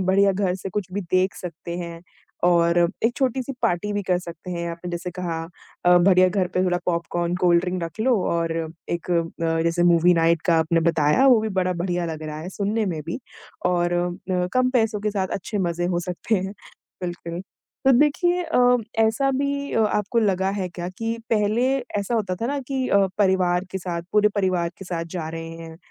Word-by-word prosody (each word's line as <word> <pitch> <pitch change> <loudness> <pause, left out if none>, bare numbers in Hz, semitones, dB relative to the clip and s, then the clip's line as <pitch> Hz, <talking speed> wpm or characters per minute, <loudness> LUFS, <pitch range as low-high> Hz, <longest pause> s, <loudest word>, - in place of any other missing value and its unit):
बढ़िया 195 +1 +3
घर 190 -1 0
से 190 +1 -6
कुछ 185 -1 -4
भी 200 - -2
देख 185 +1 +2
सकते 170 0 -7
हैं 170 -1 -7 0.5
और 170 0 +3 0.3
एक 235 +1 +3
छोटी 260 -1 +1
सी 275 - -5
पार्टी 180 +4 0
भी 205 0 -1
कर 180 -1 +1
सकते 170 0 -9
हैं 170 -1 -3
आपने 170 +1 -6
जैसे 175 +1 -4
कहा 175 -2 -4 0.4
अ, 180 0 +6
बढ़िया 185 0 +5
घर 185 0 0
पर 185 - +2
थोड़ा 180 -1 +1
पॉपकॉर्न, 170 0 -1
कोल्डड्रिंक 180 0 +2
रख 165 +6 -6
लो 250 +1 +3
और 165 -1 0 0.4
एक 170 +1 -3
अ, 170 -1 +3 0.4
जैसे 170 +1 +1
मूवी 175 0 +5
नाइट 165 0 +2
का 170 -2 +4
आपने 165 +1 +2
बताया 155 - +3
वो 250 -4 +6
भी 220 - -2
बड़ा 180 0 +1
बढ़िया 175 0 -2
लग 160 -1 -5
रहा 155 0 -5
है 170 - -6
सुनने 210 +2 0
में 165 -4 -2
भी 170 - -3 0.5
और 175 -1 +1
अ, 180 +1 -1
कम 255 0 +3
पैसों 225 -4 +1
के 210 +1 0
साथ 195 -2 -1
अच्छे 205 +3 -4
मज़े 175 -2 -1
हो 175 -1 0
सकते 180 +5 -2
हैं। 190 -1 -1 0.5
बिल्कुल, 175 -1 -5 0.4
तो 265 - +6
देखिए 350 +5 +2
अ, 250 -7 +4 0.2
ऐसा 225 +5 +3
भी 280 +1 -1
अ, 225 - +3
आपको 210 +2 0
लगा 190 -3 +2
है 185 - -2
क्या 175 0 -6
कि 225 0 -2
पहले 220 +3 +2 0.3
ऐसा 200 +4 -2
होता 200 -5 0
था 230 - 0
ना 285 +3 -1
कि 260 0 -2
अ, 200 -1 +4
परिवार 185 -2 +2
के 190 - -3
साथ, 175 -2 -4
पूरे 210 0 +5
परिवार 185 -4 +1
के 195 - -8
साथ 170 -2 -3
जा 160 -3 -3
रहे 165 0 -6
हैं 165 -1 -9
180 Hz, 205 wpm, -23 LUFS, 170-210 Hz, 0.5 s, अ